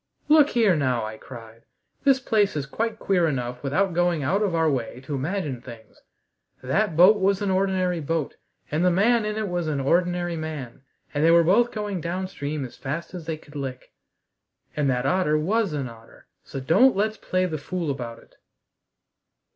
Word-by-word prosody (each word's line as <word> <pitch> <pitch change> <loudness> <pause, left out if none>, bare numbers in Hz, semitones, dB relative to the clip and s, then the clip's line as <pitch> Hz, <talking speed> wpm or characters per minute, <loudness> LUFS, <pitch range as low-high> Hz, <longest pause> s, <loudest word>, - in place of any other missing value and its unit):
"Look 300 -1 +6
here 220 -7 +3
now," 130 -6 0
I 110 0 -7
cried, 115 -2 -12 0.4
"this 270 -1 +5
place 210 -7 +1
is 145 -2 -2
quite 220 +10 -3
queer 180 -6 +1
enough 125 -4 -3
without 170 +7 0
going 175 -3 +1
out 190 +10 +1
of 195 -5 0
our 165 -1 +2
way 125 -4 -2
to 135 +3 -6
imagine 145 -2 -3
things! 115 -3 -13 0.6
That 160 +6 0
boat 195 +5 +7
was 195 0 +2
an 195 - 0
ordinary 185 -2 +1
boat, 160 -1 -2 0.4
and 155 +3 +1
the 180 - +5
man 215 +5 +3
in 210 0 -2
it 215 -1 -1
was 175 -3 -2
an 150 -3 -1
ordinary 175 +4 +1
man, 155 -7 -6 0.3
and 145 0 0
they 165 - +5
were 170 0 +6
both 230 +8 +3
going 205 -4 -3
downstream 170 -5 -4
as 125 - -11
fast 150 +7 -5
as 170 -3 -8
they 160 -1 -2
could 150 -1 -18
lick. 130 -3 -6 0.8
And 145 -2 +1
that 125 0 0
otter 155 -1 +2
was 200 +5 +1
an 140 -3 -3
otter, 115 -1 -15 0.2
so 135 - -7
don't 190 - +4
let's 215 +2 0
play 185 0 0
the 160 -4 -3
fool 170 +1 -3
about 120 -4 -6
it!" - - -21
165 Hz, 185 wpm, -24 LUFS, 140-195 Hz, 0.8 s, boat